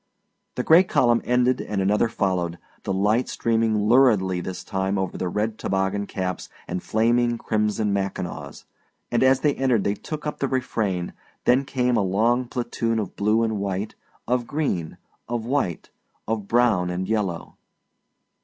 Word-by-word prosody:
The 125 - -1
gray 165 +6 +7
column 120 -9 +2
ended 125 +1 +2
and 105 - -3
another 105 +4 +2
followed, 90 -5 -1 0.3
the - - -1
light 105 +6 +1
streaming 110 -2 +1
luridly 105 -8 +4
this 90 +1 -6
time 95 +1 -1
over 95 -1 -2
red 110 +4 -2
toboggan 95 +1 -1
caps 90 -2 -4 0.2
and 90 - -3
flaming 120 +2 +2
crimson 105 -1 0
mackinaws, 90 -7 -4 0.5
and 120 - +2
as 130 0 +4
they 145 -2 +3
entered 125 -7 +1
they 100 - +1
took 150 +7 -7
up 150 - -4
the 140 - 0
refrain; 110 -9 -2 0.3
then 130 +3 +4
came 125 -2 +1
a - - +3
long 115 +6 +1
platoon 120 -2 -2
of 105 -4 -3
blue 105 +3 +2
and 110 -2 -1
white, 100 +1 -3 0.3
of 120 0 0
green, 125 - -2 0.3
of 120 -2 -2
white, 120 - -2 0.4
of 110 -2 -2
brown 115 -7 +3
and 90 +1 -3
yellow. 100 -6 -2
110 Hz, 155 wpm, -24 LUFS, 95-120 Hz, 0.5 s, gray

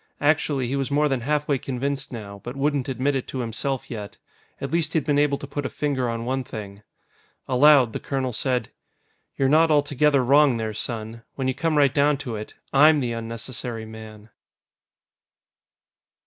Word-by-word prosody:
Actually, 145 -3 +1
he 135 - -2
was 135 -1 -1
more 150 +1 +2
than 135 -4 -1
halfway 145 +1 0
convinced 135 +2 -3
now, 100 -4 -8
but 120 - -6
wouldn't 140 -1 0
admit 135 +2 0
it 135 -2 -2
to - - -6
himself 125 +3 -3
yet. 105 -3 -7 0.4
At - - -5
least 165 -1 0
he'd 155 -5 +1
been 145 -2 +2
able 145 -1 +2
to - - -8
put 145 +1 -4
a - - -2
finger 135 -4 -1
on 115 0 -3
one 130 +1 -1
thing. 100 -4 -8 0.7
Aloud, 130 -2 +5
the - - -3
colonel 130 -2 -2
said: 125 0 -1 0.7
"You're 135 - +2
not 160 +4 +5
altogether 145 -2 +3
wrong 140 -1 +5
there, 110 -1 -3
son. 110 +1 -5
When 135 -2 -2
you 130 - +1
come 155 +3 0
right 140 -2 +4
down 145 0 +3
to 120 -3 -4
it, 105 0 -7 0.2
I'm 150 +2 +6
the 125 -3 -1
unnecessary 115 0 -5
man." 110 -1 -11
135 Hz, 175 wpm, -24 LUFS, 115-145 Hz, 0.7 s, I'm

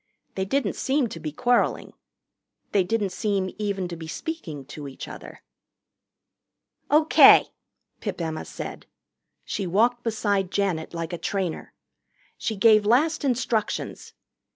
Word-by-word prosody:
They 190 - -2
didn't 260 -1 0
seem 265 -3 0
to 165 - -7
be 155 -1 -5
quarreling. 245 +10 +1 0.8
They 195 - +3
didn't 205 0 -1
seem 195 -1 -1
even 200 -3 -2
to 170 - -5
be 160 -1 -8
speaking 160 - -6
to 145 +1 -8
each 135 - -8
other. - - -11 1.5
"O.K.," 310 +2 +7 0.5
Pip - - -4
Emma 160 -2 -3
said. - - -8 0.6
She 195 - -3
walked 235 +7 +2
beside 205 -5 0
Janet 175 -5 -1
like 165 +1 -4
a 175 - -4
trainer. 190 -5 -3 0.6
She 220 - -3
gave 215 +1 +5
last 285 +10 +2
instructions. 245 -4 -1
200 Hz, 130 wpm, -25 LUFS, 175-235 Hz, 1.5 s, O.K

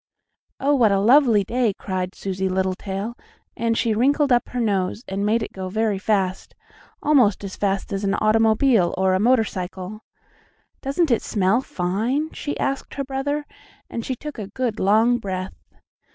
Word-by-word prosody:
"Oh, 285 +2 +2
what 235 -7 +4
a 195 - +3
lovely 235 -1 +5
day!" 230 -1 0
cried 185 -1 -4
Susie 190 -1 -2
Littletail, 190 +3 -2 0.4
and 230 0 0
she 230 -2 +1
wrinkled 280 +5 +2
up 240 -1 +2
her 250 - -4
nose, 200 -1 0
and 195 +1 -3
made 225 +1 +2
it - - -7
go 190 -1 -5
very 215 0 0
fast, 195 -3 -1 0.5
almost 250 -10 +3
as 195 -1 -6
fast 195 -1 -1
as 195 +1 -2
an 195 0 +1
automobile 220 -2 +3
or 190 0 +2
a 185 - +2
motorcycle. 210 -3 -1 0.8
"Doesn't 285 +2 0
it 235 - +3
smell 205 +4 +1
fine?" 230 - -1
she 290 - -5
asked 275 0 -2
her 275 - -2
brother, 280 +2 -2 0.5
and 230 - -4
she 260 - -3
took 300 0 -8
a 205 - -5
good, 230 +1 -3
long 225 +5 +3
breath. 190 -3 -4
215 Hz, 165 wpm, -22 LUFS, 190-250 Hz, 0.8 s, lovely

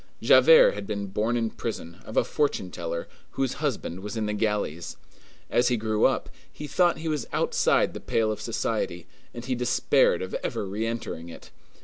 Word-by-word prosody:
Javert - - +7
had 200 - -7
been 100 -1 -3
born 105 +5 -1
in 115 -2 -1
prison, 85 -7 -6
of 110 - -7
a - - +5
fortune 125 - -1
teller, 85 0 -4 0.3
whose 135 -1 -1
husband 120 - -2
was 105 +3 -6
in 110 - -1
the 105 - -2
galleys. 105 -6 -2 0.5
As 120 - +2
he 125 - +2
grew 110 -1 +1
up, - - +1 0.2
he 150 - -8
thought 175 +3 +2
that - - -10
he 165 - -4
was 150 -5 -2
outside - - +2
the - - -6
pale 110 -1 0
of 105 - -5
society, 110 -6 -2 0.3
and 120 0 -8
he 130 - -1
despaired 125 -5 +2
of 95 - -7
ever 115 -4 -2
re 105 +4 -3
entering 110 -7 -5
it. 85 - -12
110 Hz, 195 wpm, -26 LUFS, 100-125 Hz, 0.5 s, Javert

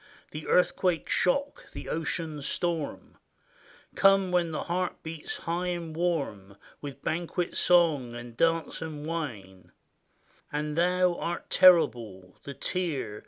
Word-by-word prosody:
The 155 0 -7
earthquake 180 -1 +2
shock, 280 +10 0
the - - -7
ocean 160 -1 -3
storm; 165 +2 -3 0.7
Come 195 -1 +4
when 175 -2 +2
the 155 - -3
heart 180 +1 -2
beats 160 -1 -5
high 175 +2 -2
and 170 -3 -4
warm, 140 - -2 0.2
With 140 -2 -8
banquet 175 +1 -2
song, 155 -9 +3
and 120 -1 -9
dance, 165 +2 +1
and 155 -2 -6
wine; 100 - -6 0.8
And 150 0 -2
thou 180 +1 +2
art 170 0 -4
terrible 120 - +4
— - - -41
the 140 - -7
tear. 150 - -3
165 Hz, 125 wpm, -28 LUFS, 140-175 Hz, 0.8 s, Come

